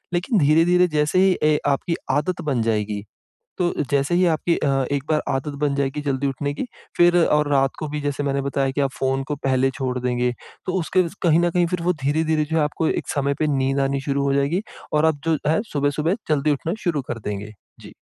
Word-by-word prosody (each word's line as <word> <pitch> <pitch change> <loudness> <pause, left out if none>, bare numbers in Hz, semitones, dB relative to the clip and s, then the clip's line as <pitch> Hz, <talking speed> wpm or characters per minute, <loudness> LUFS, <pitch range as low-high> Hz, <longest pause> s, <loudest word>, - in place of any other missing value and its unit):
लेकिन 195 +5 +1
धीरे-धीरे 170 +4 +4
जैसे 150 +5 +2
ही 190 -1 +4
ए 155 0 +4
आपकी 145 +4 0 0.2
आदत 150 +6 0
बन 125 -4 +1
जाएगी, 105 -2 -1 0.6
तो 175 -1 +1 0.2
जैसे 140 +3 +1
ही 180 +1 +4
आपकी 165 +1 +1
अ, - - 0 0.2
एक 140 -2 -1
बार 155 -1 +2
आदत 135 +2 -3
बन 145 -2 +1
जाएगी 140 +1 -1
जल्दी 140 -1 -1
उठने 140 +2 -2
की, 255 - -4 0.3
फिर 175 0 +5
और 150 -1 +2
रात 135 -1 +3
को 155 - -3
भी 150 +1 -4
जैसे 145 0 -2
मैंने 140 0 0
बताया 135 0 0
कि 145 - -2
आप 135 - +1
फ़ोन 135 0 0
को 150 - -2
पहले 135 0 +2
छोड़ 125 -1 -2
देंगे, 125 0 0 0.3
तो 185 - -1
उसके 185 +2 +2 0.2
कहीं 170 -1 +4
न 175 0 +2
कहीं 175 0 +2
फिर 175 0 -3
वो 180 +1 +2
धीरे-धीरे 155 +2 +1
जो 160 +2 -2
है - - +3
आपको 155 +2 -1
एक - - -2
समय 140 -1 0
पे 155 - +2
नींद 135 +1 +1
आनी 135 0 0
शुरू 140 0 -1
हो 140 0 +1
जाएगी 145 +8 +1 0.3
और 150 +1 +4
आप 155 -3 +1
जो 160 -2 +2
है 160 - +2
सुबह-सुबह 150 +5 0
जल्दी 150 0 +2
उठना 160 +6 -2
शुरू 155 -5 0
कर 115 - -3
देंगे। 105 +1 -4 0.3
जी। - - -12
145 Hz, 225 wpm, -22 LUFS, 135-165 Hz, 0.6 s, फिर